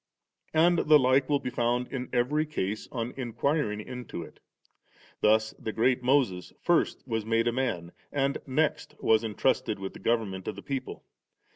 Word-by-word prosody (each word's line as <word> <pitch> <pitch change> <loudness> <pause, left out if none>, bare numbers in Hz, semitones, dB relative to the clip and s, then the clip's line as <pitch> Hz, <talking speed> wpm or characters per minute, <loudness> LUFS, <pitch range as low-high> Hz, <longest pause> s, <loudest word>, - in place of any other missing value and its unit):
And 170 +2 +5
the 155 -1 +6
like 130 0 +3
will 145 - +4
be 125 - -5
found 120 +1 0
in 130 -2 -4
every 130 +5 +2
case 110 -8 -3
on 120 -1 -3
inquiring 120 -1 -1
into 120 -6 -6
it; - - -14 0.4
— - - -30
thus 110 +1 +3
the 110 - -3
great 125 +3 +2
Moses 125 -9 +1
first 175 -5 +1
was 115 -2 -1
made 115 +1 +1
a - - +3
man, 115 -10 -2 0.2
and 140 0 0
next 150 +3 0
was 110 0 +3
entrusted 110 -4 0
with 95 0 -6
the - - -11
government 105 -5 -1
of 105 - -3
the 100 - -10
people. 135 -2 -5
120 Hz, 170 wpm, -28 LUFS, 110-135 Hz, 0.4 s, the